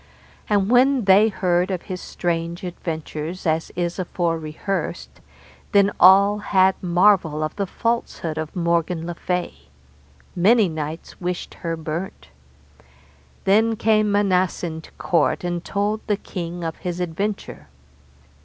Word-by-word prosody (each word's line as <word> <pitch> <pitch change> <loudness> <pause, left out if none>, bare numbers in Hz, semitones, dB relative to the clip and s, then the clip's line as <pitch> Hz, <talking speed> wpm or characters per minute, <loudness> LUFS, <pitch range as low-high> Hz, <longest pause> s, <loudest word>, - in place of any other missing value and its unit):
And 205 0 +2
when 255 -1 +4
they 200 +3 +6
heard 180 -2 +1
of 185 -3 -3
his 185 -1 -6
strange 170 0 -3
adventures 165 0 -5
as 160 0 0
is 175 +1 -2
afore 170 -2 -1
rehearsed, 160 +5 -4 0.5
then 200 0 +5
all 200 +3 +6
had 190 -2 +3
marvel 175 -4 +3
of 155 - -3
the 200 -1 -2
falsehood 230 -8 -2
of 155 -1 -5
Morgan 170 -1 0
le 175 - -4
Fay; 180 +1 -2 0.8
many 210 +4 +4
knights 155 +1 -6
wished 180 0 -4
her 165 -1 -4
burnt. 160 +4 -6 1.1
Then 220 +3 +3
came 215 -1 +2
Manassen 185 -5 0
to - - -16
court 165 -1 +1
and 175 -1 -2
told 205 +2 -1
the 205 -2 +1
king 175 -3 -6
of 165 -1 -4
his 180 -1 -4
adventure. 180 - -4
180 Hz, 130 wpm, -22 LUFS, 165-200 Hz, 1.1 s, they